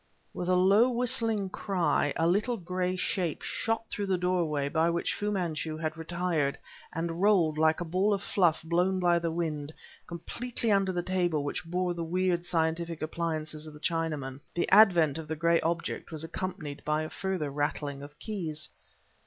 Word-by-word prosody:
With 180 - -3
a 185 - +4
low 200 +7 +5
whistling 230 -4 0
cry 175 -8 +1
a 165 - +1
little 210 +8 +2
gray 180 0 -2
shape 180 -3 -1
shot 225 0 -1
through 205 -1 -2
the 190 -1 +2
doorway 170 -6 0
by 160 +3 +2
which 170 0 0
Fu 210 - -2
Manchu 165 -5 -2
had 155 -1 -3
retired, 165 -3 -1 0.3
and 165 +2 -3
rolled, 175 -7 +4
like 160 0 +4
a - - -2
ball 185 +5 +1
of 200 -1 0
fluff 175 -7 +2
blown 180 +3 +1
by 175 -1 +3
the 170 0 -1
wind, 155 -3 -2 0.4
completely 230 +7 -2
under 195 -1 +3
the 175 -1 -2
table 175 -5 0
which 145 - -3
bore 180 +1 -1
the 170 -1 -4
weird 175 +1 0
scientific 165 -1 -1
appliances 155 -1 -3
of 155 - -10
the - - -11
Chinaman; 150 -5 -2 0.2
the 175 - +1
advent 175 -8 +6
of 160 - -7
the 160 - -2
gray 170 +1 +3
object 170 +1 -2
was 160 -1 -4
accompanied 165 -3 -5
by 155 +1 0
a 155 - -5
further 180 -6 -2
rattling 145 -1 -2
of 145 +1 -11
keys. 170 -8 -3
170 Hz, 175 wpm, -29 LUFS, 155-185 Hz, 0.4 s, advent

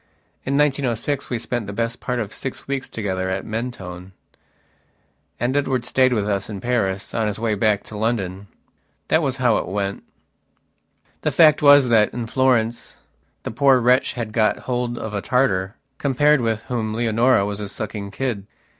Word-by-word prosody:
In 140 +1 +1
1906 140 -1 0
we 120 - -1
spent 120 -1 -3
the 100 - -5
best 115 +3 -2
part 125 -1 -2
of 110 -3 -4
six 130 - -6
weeks 135 -1 -3
together 95 -4 -3
at 95 +1 -3
Mentone, 95 -6 -6 1.3
and 120 +3 0
Edward 130 -4 0
stayed 130 -1 +3
with 105 -4 0
us 100 -1 -1
in 100 -2 -5
Paris 100 -5 -1
on 110 -2 0
his 105 - -2
way 110 -1 0
back 105 0 +1
to 110 - -10
London. 100 -3 -2 0.6
That 160 - +4
was 135 -4 -1
how 125 -4 +3
it - - -3
went. 100 +1 -3 1.2
The - - +1
fact 155 -2 +5
was 145 -3 +7
that 110 -3 +4
in 120 -1 -3
Florence 120 -2 0 0.4
the - - -4
poor 135 +2 +4
wretch 125 +2 +3
had 115 -3 -5
got 110 -1 +1
hold 120 -1 -2
of 110 -2 -5
a 100 - -2
Tartar, 105 -6 +1 0.2
compared 145 +1 +3
with 110 -2 -1
whom 110 -3 -3
Leonora 115 -1 +3
was 100 0 -3
a 105 -1 -5
sucking 105 -1 -5
kid. 105 -2 -3
115 Hz, 170 wpm, -22 LUFS, 105-130 Hz, 1.3 s, was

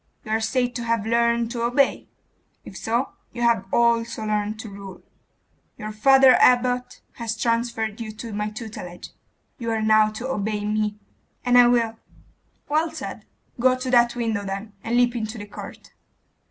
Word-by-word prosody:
You 215 - -6
are 220 +1 +1
said 245 +2 0
to 235 - -4
have 230 -2 0
learned 235 0 +1
to 235 -1 -3
obey. 245 +4 +1 0.6
If - - -10
so 235 +6 -1 0.2
you 240 - -3
have 230 -5 +2
also 235 -1 +2
learned 210 0 -1
to 220 - -8
rule. 195 -2 -10 0.7
Your 215 -1 -6
father 265 +4 +6
abbot 250 0 +3 0.2
has 225 -2 -3
transferred 230 -2 -1
you 220 -1 -5
to 220 0 -8
my 210 +1 -2
tutelage. 210 -5 -8 0.5
You 230 -1 -3
are 225 -1 0
now 215 0 +5
to 240 +4 -5
obey 210 -4 -2
me.' 210 0 -1 0.5
'And 245 0 +3
I 245 -1 +8
will.' 230 -2 +1 0.7
'Well 310 +3 +1
said. - - -7 0.3
Go 255 +1 +4
to 255 0 -4
that 240 -1 +4
window, 225 -4 -1
then, 200 +2 -5
and 235 +2 0
leap 245 0 +3
into 220 0 -4
the 205 - -7
court. 205 - -11
230 Hz, 165 wpm, -23 LUFS, 215-245 Hz, 0.7 s, I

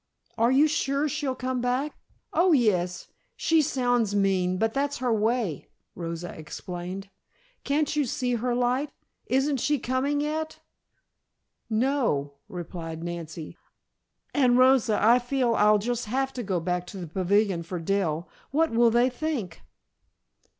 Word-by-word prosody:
Are 230 +2 +3
you 280 +4 +5
sure 290 -2 0
she'll 285 -2 -2
come 255 -1 -2
back?" 255 +4 0 0.4
"Oh, 345 +1 +4
yes. 180 - +1 0.3
She 325 -1 +3
sounds 245 -6 +1
mean, 185 -2 +2
but 225 +2 0
that's 285 +1 -1
her 250 -3 0
way," 220 - 0 0.3
Rosa 170 0 -5
explained. 180 +5 -7 0.5
"Can't 295 +1 0
you 295 -2 +2
see 245 0 -1
her 240 +1 0
light? 250 +4 +1 0.4
Isn't 270 +2 +1
she 295 +4 +1
coming 265 +3 0
yet?" 310 +2 -3 1.1
"No," 225 - +1
replied 165 -2 -6
Nancy. 170 -1 -6 0.7
"And 250 -4 +4
Rosa, 255 -4 +4
I 235 +4 +5
feel 245 -1 0
I'll 210 -1 +5
just 240 +3 -2
have 265 +4 -1
to 250 - -4
go 190 -5 -1
back 180 +1 -2
to 195 - -8
the 180 - -5
pavilion 190 +2 +1
for 175 +2 -5
Dell. 170 -2 -1 0.2
What 320 +4 +2
will 235 +1 +5
they 240 +2 +4
think?" 255 - -3
235 Hz, 140 wpm, -26 LUFS, 180-270 Hz, 1.1 s, you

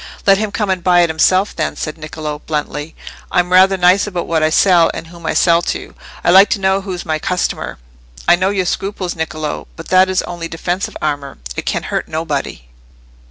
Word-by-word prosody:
"Let 195 0 +5
him 215 -1 -2
come 205 -2 -1
and 185 -2 -2
buy 175 -1 +5
it 170 -2 +2
himself, 185 +5 +2
then," - - -2
said 155 - -4
Niccolò, 155 -1 -6
bluntly. 150 0 -4 0.4
"I'm 180 0 +1
rather 190 +1 +5
nice 180 +3 +4
about 180 -4 -3
what 165 -1 0
I 155 - +3
sell, 175 0 +4
and - - -6
whom 170 0 -10
I - - -1
sell 170 -1 +4
to. - - -4 0.3
I - - +4
like 190 +3 +7
to - - 0
know 190 0 +1
who's 185 -3 -6
my 155 -1 -1
customer." 180 +3 -2 0.5
"I 175 - +7
know 185 +2 0
your 195 -2 0
scruples, 190 -1 -3
Niccolò. 155 -2 -4
But 165 - -10
that 185 0 +5
is 185 0 +1
only 175 -1 -6
defensive 175 +4 -3
armour: 145 -2 -3 0.2
it - - -5
can - - -1
hurt - - -3
nobody." 150 - -4
175 Hz, 205 wpm, -17 LUFS, 160-190 Hz, 0.5 s, like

